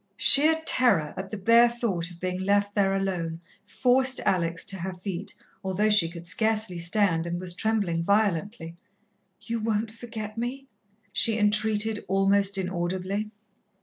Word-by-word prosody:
Sheer 315 +3 +6
terror 195 - +2
at 190 0 -6
the 215 - -5
bare 230 +4 +5
thought 205 -8 -2
of 175 -1 -14
being 180 0 -3
left 205 +1 +1
there 195 -2 +1
alone 175 -4 -3 0.3
forced 260 +1 +2
Alex 170 -2 -1
to 195 - -2
her 185 +2 -5
feet, 195 -1 -5 0.3
although 195 +3 0
she 185 -6 +4
could 170 0 -10
scarcely 220 -2 0
stand, 170 -1 0
and 170 +1 -3
was 180 -1 -2
trembling 200 -5 0
violently. 200 -3 -1 0.7
"You 230 0 -4
won't 215 0 -1
forget 225 -2 -8
me?" 255 +3 -4 0.5
she 225 +2 +1
entreated 215 0 +1
almost 195 +1 +2
inaudibly. 185 +3 -3
200 Hz, 145 wpm, -26 LUFS, 180-220 Hz, 0.7 s, Sheer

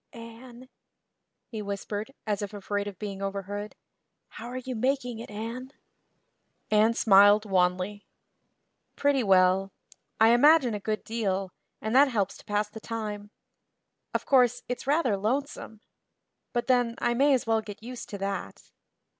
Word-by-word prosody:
"Anne," 235 +2 -12 0.8
he 220 -3 -6
whispered, 205 +3 -5
as 210 -2 -1
if 205 0 -5
afraid 205 0 -3
of 200 -3 -7
being 200 -1 -6
overheard, 200 +1 -5 0.5
"how 230 - -9
are 250 +1 -6
you 255 0 -5
making 250 -1 -1
it, 230 - -8
Anne?" 230 +5 -6 1.0
Anne 215 +2 +4
smiled 205 0 +6
wanly. 185 +1 0 0.9
"Pretty 285 -2 +2
well. 190 -1 +3 0.5
I 220 +1 +6
imagine 255 +1 +5
a 210 - -3
good 215 +1 -3
deal, 195 -4 -2 0.3
and 220 +3 -3
that 280 +2 +7
helps 205 -7 -1
to - - -17
pass 210 0 0
the 210 +1 -10
time. 210 -2 -5 0.8
Of - - -2
course, 250 -3 +3
it's 250 +1 -5
rather 285 -7 +2
lonesome. 220 0 -3 0.7
But 240 -1 -1
then, 245 -3 +2
I 240 - 0
may 275 +3 +4
as 255 - -2
well 225 -1 +2
get 210 0 -10
used 245 +1 -8
to 200 - -5
that." 195 0 -5
220 Hz, 145 wpm, -27 LUFS, 205-245 Hz, 1.0 s, that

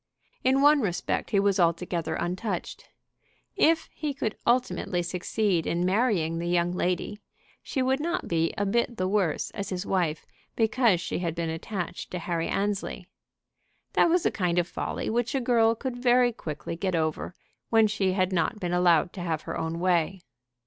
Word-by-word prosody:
In 265 +2 +3
one 295 0 +6
respect 180 -6 -1
he 205 - +2
was 200 -1 +2
altogether 170 -1 0
untouched. 180 +2 -4 0.7
If 325 0 +3
he 295 -3 -3
could 225 -6 -2
ultimately 235 -7 +1
succeed 180 0 0
in 175 +1 0
marrying 185 -5 +1
the 170 - -3
young 175 0 +2
lady, 180 +3 -2 0.4
she 265 - -2
would 265 +2 +1
not 345 +4 -2
be 165 -1 +1
a 205 - 0
bit 235 +3 0
the 185 - 0
worse 190 -6 0
as 200 0 -5
his 185 0 -3
wife 170 -5 0 0.3
because 225 -4 +3
she 175 - -3
had 170 -2 -2
been 165 -1 -2
attached 175 +2 -5
to 180 - -4
Harry 170 -1 -2
Annesley. 200 0 -2 0.8
That - - +4
was 350 +1 +2
a - - +3
kind 180 -3 0
of 175 -1 +2
folly - - -4
which 240 +4 0
a - - +2
girl 230 -2 +3
could 255 +1 -4
very 245 0 +4
quickly 165 -6 -6
get 185 +1 -1
over 160 +2 -2 0.3
when 225 -1 +5
she 205 -3 +1
had 185 0 +1
not 180 +5 0
been 175 -2 -2
allowed 175 -1 +3
to 185 - -6
have 165 -3 -2
her - - -5
own 160 +1 -3
way. 180 0 +1
185 Hz, 175 wpm, -27 LUFS, 175-230 Hz, 0.8 s, one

